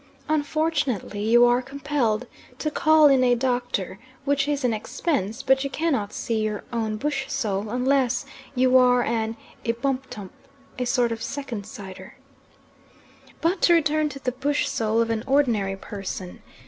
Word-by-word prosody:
Unfortunately, 295 Hz, -, -1 dB
you 240 Hz, +2 st, +6 dB
are 245 Hz, +1 st, +3 dB
compelled 270 Hz, -4 st, -1 dB, 0.3 s
to 305 Hz, -, -2 dB
call 310 Hz, 0 st, +5 dB
in 270 Hz, -2 st, +4 dB
a 245 Hz, -1 st, +4 dB
doctor, 245 Hz, -6 st, -2 dB, 0.3 s
which 280 Hz, 0 st, +1 dB
is 290 Hz, -2 st, -1 dB
an 245 Hz, -2 st, +2 dB
expense, 230 Hz, -, -2 dB
but 265 Hz, 0 st, +3 dB
you 275 Hz, -, -2 dB
cannot 275 Hz, -10 st, -1 dB
see 230 Hz, -2 st, -2 dB
your 215 Hz, -1 st, -2 dB
own 220 Hz, -2 st, -1 dB
bush 270 Hz, +2 st, -2 dB
soul, 205 Hz, -1 st, -2 dB
unless 255 Hz, +1 st, +1 dB, 0.3 s
you 255 Hz, 0 st, +3 dB
are 250 Hz, -1 st, +4 dB
an 225 Hz, -1 st, -1 dB, 0.3 s
Ebumtup, 245 Hz, -4 st, -3 dB, 0.5 s
a 250 Hz, -, 0 dB
sort 245 Hz, -2 st, +1 dB
of 225 Hz, 0 st, -4 dB
second 250 Hz, -7 st, -5 dB
sighter. 190 Hz, -1 st, -10 dB, 1.2 s
But 345 Hz, +4 st, +1 dB
to 345 Hz, -, +6 dB
return 310 Hz, -1 st, +2 dB
to 275 Hz, -, -8 dB
the 255 Hz, -2 st, -2 dB
bush 285 Hz, +3 st, 0 dB
soul 225 Hz, -4 st, +1 dB
of 230 Hz, 0 st, 0 dB
an 220 Hz, 0 st, -1 dB
ordinary 235 Hz, -9 st, +2 dB
person. 195 Hz, -2 st, -7 dB
250 Hz, 150 wpm, -24 LUFS, 220-280 Hz, 1.2 s, you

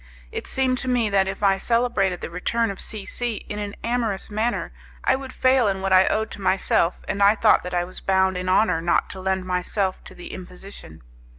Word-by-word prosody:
It -, -, -5 dB
seemed 255 Hz, -1 st, +1 dB
to 260 Hz, -, -5 dB
me 240 Hz, -4 st, +1 dB
that 195 Hz, -1 st, +3 dB
if 195 Hz, +2 st, -5 dB
I 195 Hz, -1 st, +3 dB
celebrated 230 Hz, -6 st, +1 dB
the -, -, -6 dB
return 225 Hz, +5 st, 0 dB
of 195 Hz, -, -8 dB
C 210 Hz, -3 st, -4 dB
C 240 Hz, -2 st, -2 dB
in 210 Hz, -, -4 dB
an 205 Hz, -1 st, -5 dB
amorous 230 Hz, -5 st, -1 dB
manner, 220 Hz, +3 st, -1 dB, 0.3 s
I -, -, +3 dB
would 265 Hz, 0 st, -7 dB
fail 255 Hz, -3 st, +3 dB
in 195 Hz, -1 st, 0 dB
what 190 Hz, 0 st, +1 dB
I 185 Hz, 0 st, +6 dB
owed 220 Hz, +1 st, 0 dB
to -, -, -8 dB
myself, 185 Hz, -2 st, +1 dB
and 200 Hz, -, -2 dB
I 200 Hz, +2 st, +6 dB
thought -, -, +4 dB
that 180 Hz, -, -7 dB
I 175 Hz, -, +1 dB
was 180 Hz, +1 st, -7 dB
bound 190 Hz, -1 st, +2 dB
in 180 Hz, 0 st, -3 dB
honour 185 Hz, -3 st, +3 dB
not 170 Hz, -, +1 dB
to 190 Hz, -, -8 dB
lend 190 Hz, 0 st, -1 dB
myself 185 Hz, +1 st, -1 dB
to -, -, -11 dB
the 175 Hz, -, -9 dB
imposition. 180 Hz, -, -10 dB
195 Hz, 220 wpm, -23 LUFS, 185-230 Hz, 0.3 s, I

